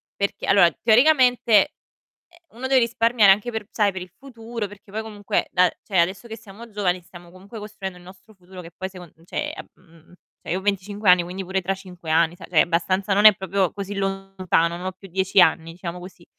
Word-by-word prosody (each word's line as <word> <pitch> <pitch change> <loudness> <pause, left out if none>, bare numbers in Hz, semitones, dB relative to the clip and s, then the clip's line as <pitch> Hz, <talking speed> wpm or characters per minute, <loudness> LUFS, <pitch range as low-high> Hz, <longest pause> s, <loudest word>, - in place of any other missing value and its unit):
perché 200 0 -3
allora 185 -4 +5
teoricamente, 250 0 +4 0.8
eh, 340 - -23
uno 255 +3 -6
deve 265 -1 +4
risparmiare 230 -3 +4
anche 210 +5 -1
per 220 -3 -5
sai 210 -2 +2
per 185 -1 -6
il 180 - -12
futuro, 230 -4 -7
perché 200 0 -16
poi 220 +1 -3
comunque 205 -2 -3
da 180 0 +4
cioè, 190 - -2
adesso 190 +7 -2
che 225 - -7
siamo 220 +2 -13
giovani 190 -4 -1
stiamo 175 0 -15
comunque 195 +5 -12
costruendo 205 -3 -8
il 175 - -17
nostro 190 +4 -16
futuro 185 -1 -13
che 165 - -12
poi 190 0 -5
secon 180 -4 -13
cioè, 295 - -4
ehm, - - -10
cioè, - - -28
mhmm, 165 -1 -21 0.3
io 180 - -2
ho - - -9
25 200 0 0
anni 180 -1 +5
quindi 185 +2 -6
pure 190 +1 -2
tra 195 +2 -1
5 180 -3 -13
anni 165 +2 +2
sai - - -11
cioè, 165 -4 +4
abbastanza 185 +3 0
non 205 +2 +2
è 215 - +9
proprio 190 -1 -1
così 200 0 -6
lontano, 195 -3 -1
non 180 +2 -7
ho 185 - -3
più 190 +1 -15
10 190 +2 +2
anni 165 -2 +2
diciamo 175 0 -7
così. 180 -1 -13
195 Hz, 215 wpm, -22 LUFS, 180-215 Hz, 0.8 s, è